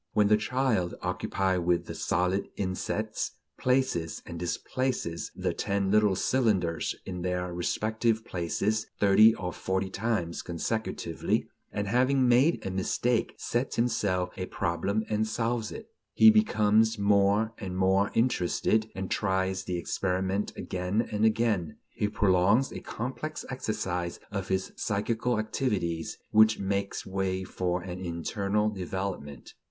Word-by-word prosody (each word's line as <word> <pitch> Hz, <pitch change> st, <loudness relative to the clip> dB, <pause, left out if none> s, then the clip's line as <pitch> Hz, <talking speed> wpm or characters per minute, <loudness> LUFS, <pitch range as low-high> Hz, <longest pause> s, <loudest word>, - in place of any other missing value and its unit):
When 105 Hz, -1 st, +4 dB
the 105 Hz, -, +7 dB
child, 110 Hz, -6 st, 0 dB
occupied 90 Hz, +1 st, 0 dB
with 85 Hz, 0 st, +1 dB
the -, -, -6 dB
solid 90 Hz, +3 st, 0 dB
insets, 95 Hz, -2 st, -2 dB, 0.3 s
places 125 Hz, -11 st, 0 dB
and 85 Hz, -1 st, -7 dB
displaces 90 Hz, 0 st, -2 dB
the -, -, -1 dB
ten 100 Hz, -1 st, -1 dB
little 105 Hz, -2 st, +4 dB
cylinders 100 Hz, -8 st, +1 dB
in 90 Hz, -2 st, -5 dB
their 90 Hz, 0 st, -2 dB
respective 110 Hz, +5 st, 0 dB
places 100 Hz, +5 st, -1 dB
thirty 105 Hz, +3 st, +6 dB
or 90 Hz, -2 st, -4 dB
forty 95 Hz, 0 st, -2 dB
times 100 Hz, -6 st, -1 dB
consecutively; 110 Hz, +6 st, -2 dB, 0.2 s
and, 100 Hz, 0 st, -2 dB
having 130 Hz, +4 st, +3 dB
made 130 Hz, +7 st, +3 dB
a 95 Hz, -, -2 dB
mistake, 115 Hz, +5 st, 0 dB
sets 120 Hz, +3 st, -2 dB
himself 100 Hz, -6 st, 0 dB
a 95 Hz, -, -3 dB
problem 100 Hz, +6 st, -1 dB
and 110 Hz, 0 st, 0 dB
solves 115 Hz, 0 st, -1 dB
it, 225 Hz, -, -8 dB, 0.3 s
he 220 Hz, -, +8 dB
becomes 110 Hz, -, +3 dB
more 100 Hz, +2 st, +3 dB
and 95 Hz, -3 st, -5 dB
more 95 Hz, +1 st, +3 dB
interested, 110 Hz, -1 st, +1 dB
and 95 Hz, -1 st, -4 dB
tries 95 Hz, -1 st, 0 dB
the 90 Hz, -, -2 dB
experiment 95 Hz, +3 st, -1 dB
again 95 Hz, +5 st, -1 dB
and 105 Hz, +1 st, +2 dB
again; 110 Hz, -7 st, +1 dB
he 105 Hz, -, -1 dB
prolongs 105 Hz, +4 st, +3 dB
a -, -, -6 dB
complex 135 Hz, +6 st, -5 dB
exercise 90 Hz, -8 st, -3 dB
of 100 Hz, -2 st, -3 dB
his 95 Hz, 0 st, -1 dB
psychical 110 Hz, +3 st, -1 dB
activities 105 Hz, -7 st, -1 dB
which 110 Hz, 0 st, +6 dB
makes 100 Hz, 0 st, -2 dB
way 95 Hz, -1 st, -1 dB
for 90 Hz, -1 st, -2 dB
an 90 Hz, 0 st, -6 dB
internal 100 Hz, +5 st, -1 dB
development. 95 Hz, -, -5 dB
100 Hz, 130 wpm, -28 LUFS, 90-110 Hz, 0.3 s, he